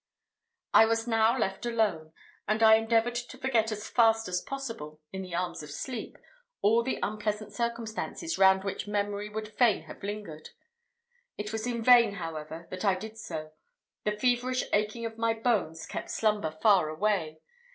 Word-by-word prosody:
I 225 - +8
was 225 0 0
now 225 +1 +3
left 195 -5 -2
alone, 215 -10 0 0.4
and 215 +2 +1
I 220 0 +8
endeavoured 225 +1 +3
to 245 +1 -5
forget 235 -4 +1
as 210 0 -5
fast 225 -1 +3
as 180 0 -1
possible, 230 - -6
in 190 - -4
the 180 -2 -6
arms 180 -1 -2
of 150 - -9
sleep, 225 - -6 0.5
all 225 +3 +5
the 260 +3 -2
unpleasant 210 0 -2
circumstances 235 +7 -3
round 190 0 +6
which 195 +1 -4
memory 205 0 -2
would 215 0 -6
fain 235 -2 +3
have - - -12
lingered. 200 -7 -6 0.9
It 210 0 -4
was 220 +2 -2
in 235 -2 -2
vain, 235 -4 +6
however, 160 -1 -6
that 185 +2 -5
I 195 -3 +3
did 220 +3 -8
so; 155 -6 -6 0.5
the 210 - 0
feverish 250 +2 +1
aching 215 +3 0
of 225 0 -6
my 230 0 +2
bones 210 -9 0
kept - - -6
slumber 210 -6 +1
far 180 0 +3
away. 160 -2 -1
215 Hz, 165 wpm, -29 LUFS, 190-230 Hz, 0.9 s, I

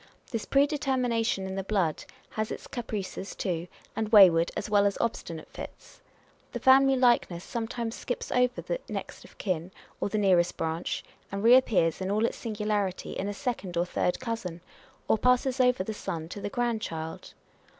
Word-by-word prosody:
This 230 -3 -2
pre 275 +1 +4
determination 250 -8 0
in 190 - -4
the 195 - -2
blood 185 -6 0 0.3
has 215 0 -2
its - - -6
caprices 215 -6 -5
too, 175 -2 -2 0.3
and 220 -1 -1
wayward 175 -6 +7
as - - -3
well 205 -1 +4
as 200 - -1
obstinate 170 -8 -3
fits. - - -10 0.5
The 240 - -3
family 270 +2 +6
likeness 240 -9 +2
sometimes 230 -1 -3
skips 245 - -4
over 250 0 +1
the - - -2
next - - -6
of - - -17
kin 180 -3 -2 0.3
or - - -1
the 215 - -1
nearest 185 -4 +3
branch, 160 +2 -2 0.3
and 200 +1 -3
reappears 225 -9 +5
in 185 - -2
all 215 +3 +2
its - - -2
singularity 210 -4 -2
in 195 - -3
a 205 - -2
second 200 -8 -3
or 175 - +2
third 180 0 0
cousin, 225 -9 -4 0.5
or 220 - +3
passes 250 +2 +2
over 250 -6 +3
the 220 - -4
son 160 -6 -5
to 200 - -7
the 205 - -3
grand 240 -1 -1
child. 160 -2 -6
210 Hz, 175 wpm, -28 LUFS, 185-245 Hz, 0.5 s, wayward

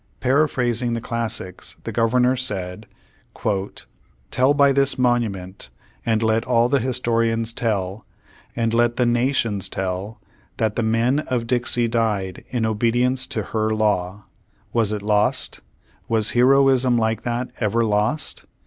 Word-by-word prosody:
"Paraphrasing 125 -4 +1
the - - -2
Classics" 115 -5 -4
the - - -5
Governor 125 +2 +2
said: 105 -5 -4 0.5
'Tell 100 - -2
by 140 -1 +5
this 140 +1 +2
monument, 105 - -1 0.3
and 110 -1 +1
let 110 0 +2
all 120 -1 +2
the 140 - +2
historians 115 -2 0
tell, 105 -3 -2 0.5
and 115 -1 0
let 120 0 +2
the 125 - +1
nations 120 -4 +1
tell 95 +3 -4 0.4
that 110 -2 0
the - - 0
men 115 +5 +1
of 125 -2 -1
Dixie 120 0 0
died 110 -5 -1
in 120 -3 -1
obedience 120 +4 +1
to 110 - -3
her 110 -1 +1
law. 105 -3 -1 0.5
Was 115 -3 +2
it 105 -1 -3
lost? 105 0 0 0.5
Was 110 -2 +2
heroism 130 0 +4
like 110 -1 0
that 120 +1 -3
ever 115 +1 +1
lost? 110 +8 -1
115 Hz, 130 wpm, -22 LUFS, 105-125 Hz, 0.5 s, by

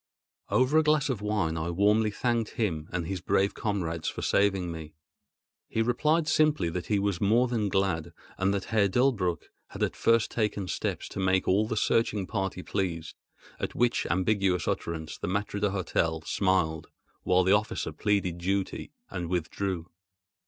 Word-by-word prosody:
Over 130 +5 +4
a - - +5
glass 150 -2 +2
of 120 -6 -2
wine 105 -6 0
I 80 +2 -2
warmly 105 +5 +3
thanked 115 +1 -1
him 85 -8 -2
and 85 -1 -2
his 95 0 -4
brave 95 +2 +1
comrades 85 -6 -2
for - - -6
saving 95 -3 +2
me. 80 -2 -8 0.7
He 115 - 0
replied 150 +7 +2
simply 155 - +3
that 90 +1 -4
he 105 - +2
was 100 -3 -1
more 115 +5 +4
than 110 -4 0
glad, 90 -4 0 0.3
and 95 +1 +2
that 100 -1 -1
Herr 100 -3 +4
Delbrück 100 - +1 0.2
had - - -4
at - - +1
the - - -19
first 115 -1 +3
taken 105 -4 -1
steps - - -3
to - - -6
make 95 0 +2
all 105 +3 +3
the 110 - -2
searching 105 -2 +1
party 95 -1 -3
pleased; 85 -5 -3 0.4
at - - -3
which 120 -1 +1
ambiguous 95 -1 +1
utterance 80 -2 -3
the - - -3
maître 100 +2 -2
d'hôtel 85 -5 0
smiled, 95 -5 +1 0.3
while 90 0 +3
the 95 +2 +4
officer 105 +1 0
pleaded 100 -5 0
duty 95 +2 -2 0.2
and 90 -3 -4
withdrew. 90 0 -2
100 Hz, 165 wpm, -28 LUFS, 90-110 Hz, 0.7 s, a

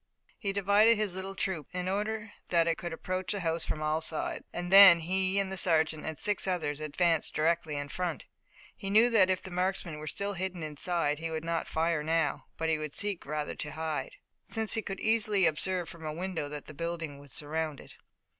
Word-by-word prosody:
He 200 -4 -1
divided 200 +3 +4
his 210 -3 -1
little 190 +1 -5
troop, 185 -7 -2
in 180 0 -2
order 210 +2 -2 0.2
that 170 -1 +3
it 165 - 0
could 175 - -4
approach 185 +3 -3
the 200 - -3
house 165 -1 +1
from 155 - -3
all 155 +1 +1
sides, 160 -1 -2
and 175 +1 -4
then 190 -4 +10
he 190 +3 0
and 195 -1 0
the 190 - -1
sergeant 160 -2 +2
and 160 -1 -4
six 205 -1 +1
others 155 -5 -1
advanced 160 +2 +1
directly 160 0 +1
in 145 0 -3
front. 180 +4 -3 0.5
He 195 -4 -5
knew 225 +4 +5
that 195 -5 +5
if 185 0 0
the 190 - -8
marksman 180 -3 -1
were 155 - -7
still 200 +6 -2
hidden 185 -2 -4
inside 155 0 -1
he 165 +1 -3
would 160 0 -4
not 165 0 -1
fire 165 -1 0
now, 160 0 0
but 160 0 -1
would 155 -1 -5
seek 200 -6 -2
rather 150 0 -2
to 150 - -5
hide, 160 - -3 0.3
since 220 -2 0
he 220 - +1
could 195 -2 -6
easily 215 -3 +3
observe 180 +3 0
from 165 -1 -10
a - - -2
window 165 -2 -4
that 150 0 -6
the - - -10
building 165 -2 -4
was 140 -1 -14
surrounded. 155 0 -4
170 Hz, 205 wpm, -30 LUFS, 155-190 Hz, 0.5 s, then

